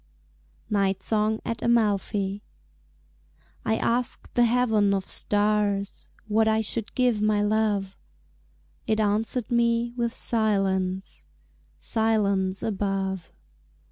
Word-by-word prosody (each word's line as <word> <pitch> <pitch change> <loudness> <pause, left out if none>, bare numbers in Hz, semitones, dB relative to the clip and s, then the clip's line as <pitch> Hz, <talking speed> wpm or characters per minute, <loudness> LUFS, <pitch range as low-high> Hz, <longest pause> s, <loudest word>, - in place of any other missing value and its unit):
Night 195 -2 0
Song 220 0 +1
at 230 -1 -3
Amalfi 205 -3 +1 1.2
I 220 - +1
asked 245 +1 -1
the 240 - +4
heaven 220 -4 +2
of 190 -1 -3
stars 205 -1 0 0.2
What 220 +1 +2
I 220 0 +3
should 220 0 -4
give 245 -4 +2
my 210 -1 +2
love 205 -2 0 0.9
It 220 0 +1
answered 220 +3 0
me 235 0 +1
with 235 -1 -1
silence, 195 -5 0 0.5
Silence 200 -4 0
above. 195 -3 -2
210 Hz, 100 wpm, -25 LUFS, 200-225 Hz, 1.2 s, the